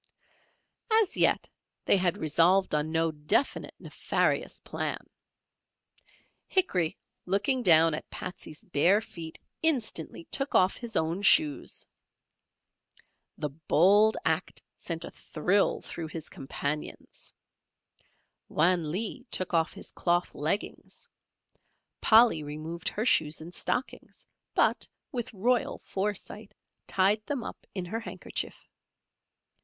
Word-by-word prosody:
As 440 -4 +3
yet - - +3 0.4
they - - +5
had 180 0 +1
resolved 170 +4 +3
on 150 +1 0
no 165 0 +1
definite 150 - 0
nefarious - - -1
plan. - - -4 1.4
Hickory 185 - +1 0.3
looking 205 +8 +2
down 165 -5 +6
at 155 - -5
Patsey's 180 -4 -7
bare 180 +5 +3
feet 165 -7 -9 0.2
instantly 240 - 0
took 275 0 -1
off 185 +1 +4
his 235 -2 -6
own 165 +4 0
shoes. 155 -7 +3 1.5
The 150 - -2
bold 190 +8 +4
act 160 +2 -1
sent 165 -1 -5
a - - -9
thrill 180 +6 0
through 165 -2 -6
his 160 0 -7
companions. 140 +2 -5 1.2
Wan 170 -1 +2
Lee 225 - -2
took 185 - -1
off 165 0 +2
his - - -9
cloth 175 0 0
leggings, 155 +8 -4 0.9
Polly 225 -7 +6
removed 155 +3 -4
her 215 - -3
shoes 155 -9 +3
and 165 +3 -9
stockings, 250 +7 -4 0.3
but - - +2 0.2
with 240 -4 -4
royal 235 +4 0
foresight, 205 +1 -4 0.3
tied 200 +3 +2
them 280 -5 -2
up - - -9
in 185 -2 -3
her 220 +6 -3
handkerchief. 230 - -5
180 Hz, 110 wpm, -28 LUFS, 160-215 Hz, 1.5 s, down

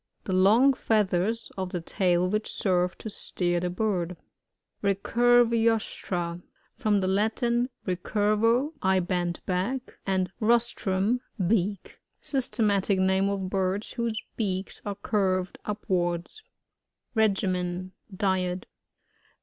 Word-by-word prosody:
The 190 - -3
long 220 +9 +5
feathers 215 -1 0
of 185 -1 -2
the 180 - -3
tail 175 +1 +1
which 215 +3 -1
serve 180 -2 +1
to - - -8
steer 175 -3 -1
the 180 +1 -1
bird. 180 -3 -1 0.7
Recurvirostra. 225 -4 +2 0.2
— - - -39
From 210 -5 +2
the 185 - 0
Latin, 235 +5 +1 0.2
recurvo, 215 - +1
I 190 0 +3
bend 175 -1 -1
back, 195 +9 -2
and 185 -1 +1
rostrum, 230 -1 +1 0.2
beak. 200 0 -1 0.2
Systematic 210 -7 +1
name 190 +1 +2
of 190 -2 -3
birds 190 +1 -1
whose 235 -3 -1 0.2
beaks 195 -3 -2
are 200 - -2
curved 190 -3 -1
upwards. 180 - -1 0.7
Regimen 185 -4 0
— - - -33
Diet. 185 -1 0
195 Hz, 110 wpm, -27 LUFS, 185-220 Hz, 0.7 s, long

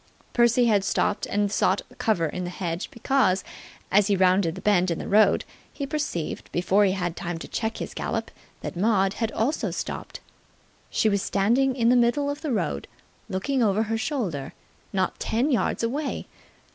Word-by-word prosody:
Percy 240 0 +4
had 210 -4 +3
stopped 205 +1 0
and 205 0 0
sought 195 -1 +2 0.2
cover 195 -7 +2
in 180 +4 -3
the 175 - -3
hedge 175 -1 -4
because, 230 -6 +1 0.5
as 200 +1 +5
he 205 - +3
rounded 185 -2 +3
the 190 - -8
bend 185 -3 +3
in 170 - -1
the - - -5
road, 205 -1 +4 0.3
he 280 - -4
perceived, 275 - -3
before 190 +4 +3
he 190 - +2
had 175 -3 -2
time 175 -1 -4
to - - -8
check 225 0 -2
his - - -5
gallop, - - -3 0.3
that - - -5
Maud 195 0 +2
had 225 -1 0
also 260 +8 0
stopped. - - -5 0.7
She - - +1
was 200 -2 +2
standing 240 +9 +2
in 235 -3 +3
the 250 - +5
middle 250 +4 +2
of 285 +1 -6
the 305 - -2
road, 225 - -1 0.4
looking 255 +8 -1
over 215 -1 +3
her 225 +1 -1
shoulder, 185 - -3 0.4
not 190 -2 -1
ten 245 +7 0
yards 240 - 0
away. 280 +6 -2
210 Hz, 180 wpm, -25 LUFS, 185-240 Hz, 0.7 s, as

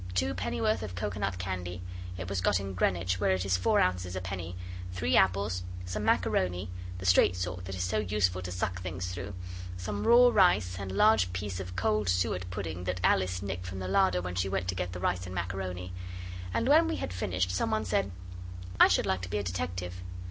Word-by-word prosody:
Two 90 0 +1
pennyworth 110 +3 0
of 100 -4 -5
coconut 100 0 -2
candy 90 -1 -4 0.3
it 90 -1 -5
was 95 -1 -1
got 90 - +3
in 100 -1 -5
Greenwich, 90 0 +1
where 95 - +3
it 95 0 -1
is 95 -2 +2
four 90 - +3
ounces 90 0 +1
a - - -1
penny 90 -2 -5 0.4
three 85 -2 0
apples, 95 -1 +3 0.2
some 95 +4 -3
macaroni 90 -4 +1 0.3
the 95 - -7
straight 90 -1 +5
sort 90 0 -4
that 95 +1 -5
is 90 - -2
so 95 +4 0
useful 95 -3 +1
to 90 0 -5
suck 90 0 -2
things 90 0 -4
through 95 +2 -6 0.4
some 100 +3 -3
raw 245 +1 +8
rice, 105 - +4
and 100 -1 -4
a - - -5
large 100 -3 +5
piece 95 0 -3
of 90 -1 -6
cold 105 +1 +1
suet 90 0 0
pudding 90 -2 -4
that 90 0 -1
Alice 95 0 +2
nicked 90 -2 -4
from 95 +1 -5
the 95 -1 -4
larder 95 -2 +3
when 90 0 -4
she 90 +2 0
went 95 -1 -1
to - - +1
get 90 -1 -3
the 90 - -6
rice 90 0 -1
and 90 - -7
macaroni. 90 0 -4 0.6
And 230 - 0
when 315 +4 +6
we 330 - -1
had 90 - -4
finished 90 0 -1
some 90 - 0
one 110 0 0
said 100 +1 +1 0.7
'I - - +10
should - - +2
like 95 -1 0
to 90 - -6
be 105 - -1
a 100 - -1
detective. 90 0 -4
90 Hz, 215 wpm, -30 LUFS, 90-100 Hz, 0.7 s, I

